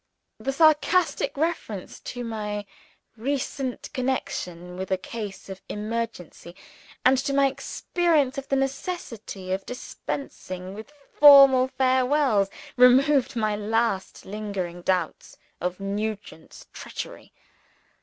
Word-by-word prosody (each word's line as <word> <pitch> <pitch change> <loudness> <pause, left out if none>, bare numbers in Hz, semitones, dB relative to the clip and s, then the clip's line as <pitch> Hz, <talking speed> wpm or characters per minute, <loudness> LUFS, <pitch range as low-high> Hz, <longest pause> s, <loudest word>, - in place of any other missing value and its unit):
The 270 - -2
sarcastic 310 0 +3
reference 290 - -3
to 245 0 -6
my 210 -2 -4 0.5
recent 265 +1 -3
connection 180 - -3
with 190 +1 -5
a 190 - +1
case 205 -1 -7
of 190 -1 -8
emergency, 210 -5 -5 0.5
and 255 0 +5
to 275 0 -1
my 280 0 +5
experience 290 0 0
of 270 - -10
the 275 - +1
necessity 265 - -4
of 190 +1 -1
dispensing 190 -7 -6
with 220 +7 -10 0.2
formal 275 -3 +8
farewells, 260 -5 +2 0.3
removed 260 +2 +5
my 215 -2 0
last 215 -1 -1
lingering 195 -4 -4
doubts 180 -2 -2 0.2
of 180 +1 -2
Nugent's 200 -3 -5
treachery. - - -8
230 Hz, 105 wpm, -25 LUFS, 195-275 Hz, 0.5 s, formal